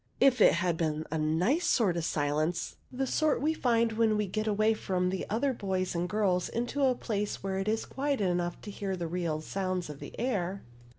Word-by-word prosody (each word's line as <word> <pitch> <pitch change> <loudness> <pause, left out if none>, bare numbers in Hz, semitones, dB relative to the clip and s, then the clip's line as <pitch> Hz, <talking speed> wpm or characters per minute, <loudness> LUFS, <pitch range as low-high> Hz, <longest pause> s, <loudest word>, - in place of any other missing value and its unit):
If 255 -4 +5
it - - +7
had 170 -1 0
been 155 -1 -1
a 160 - -1
nice 180 - +1
sort 205 - +3
of 170 - -1
silence, 155 +3 -1 0.2
the 270 +1 -1
sort 305 +3 +1
we 310 +2 +1
find 235 -6 +2
when 220 -1 +2
we 210 - +1
get 215 +3 -2
away 215 +1 +3
from 180 -4 -1
the 190 - -3
other 260 +6 +1
boys 190 -4 -2
and 175 +1 -1
girls 195 -4 +1
into 245 +5 -2
a 255 -1 +3
place 210 -5 -3
where 190 0 -1
it 195 - -3
is 220 +1 0
quiet 280 0 -1
enough 175 -3 0
to 205 - -7
hear 195 -1 -3
the 175 - -3
real 165 -2 -2
sounds 185 -1 -2
of 145 - -10
the - - -9
air. 200 -6 -1
195 Hz, 215 wpm, -30 LUFS, 175-230 Hz, 0.2 s, it